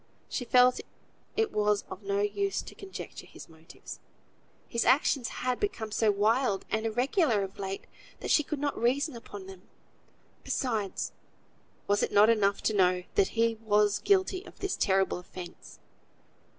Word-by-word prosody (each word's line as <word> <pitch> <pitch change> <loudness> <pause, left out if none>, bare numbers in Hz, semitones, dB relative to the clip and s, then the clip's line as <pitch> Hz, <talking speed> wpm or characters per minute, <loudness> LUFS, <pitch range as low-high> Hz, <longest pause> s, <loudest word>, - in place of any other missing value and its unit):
She 245 - -3
felt 250 +1 +5 0.6
it 445 -1 +2
was 210 -1 +1
of 190 - -8
no 200 0 0
use 395 - -1
to - - -10
conjecture 395 -4 -9
his - - -12
motives. 160 +2 -12 0.7
His 235 - 0
actions 270 -2 +3 0.2
had 250 -1 0
become 230 - -2
so 220 +1 +2
wild 210 +1 +2
and 220 +1 0
irregular 245 - +2
of 195 +2 -8
late, 195 0 -4 0.3
that - - -3
she - - +6
could 300 +1 -4
not 285 0 -1
reason 260 +5 +1
upon 205 -4 -9
them. 190 0 -13 0.7
Besides, 220 -7 -2 0.7
was 205 +1 +2
it - - 0
not 210 +2 +6
enough 200 -3 +1
to 220 - +1
know 180 -2 +3
that 390 - +1
he 230 -1 +2
was 210 -1 +3
guilty 380 -1 +2
of - - -14
this 390 -1 -2
terrible 190 -2 +1
offence? 180 -1 -10
220 Hz, 155 wpm, -29 LUFS, 200-265 Hz, 0.7 s, she